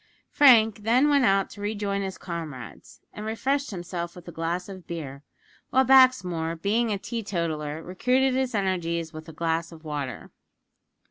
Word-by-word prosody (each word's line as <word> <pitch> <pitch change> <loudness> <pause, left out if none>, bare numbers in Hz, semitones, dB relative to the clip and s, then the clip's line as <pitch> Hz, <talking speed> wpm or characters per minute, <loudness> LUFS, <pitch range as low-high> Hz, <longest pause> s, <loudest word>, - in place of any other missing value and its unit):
Frank 225 -6 +6
then 240 +7 +3
went 280 -3 +4
out 195 -2 +2
to 205 - -10
rejoin 205 -1 -2
his 190 -1 -4
comrades, 155 - -8
and 210 - -7
refreshed 270 +6 -1
himself 175 -2 -5
with 180 -1 -13
a - - -6
glass 170 +2 -3
of 190 -3 -10
beer; 140 -5 -6 0.5
while 265 0 +3
Baxmore, 220 -12 +4
being 220 +5 +1
a 205 - 0
teetotaller, 170 -9 -3
recruited 255 +9 +1
his 260 -2 -1
energies 170 -4 -1
with 155 +1 -9
a - - -7
glass 165 +1 -2
of 165 -1 -13
water. 145 -4 -5
185 Hz, 155 wpm, -26 LUFS, 165-225 Hz, 0.5 s, Frank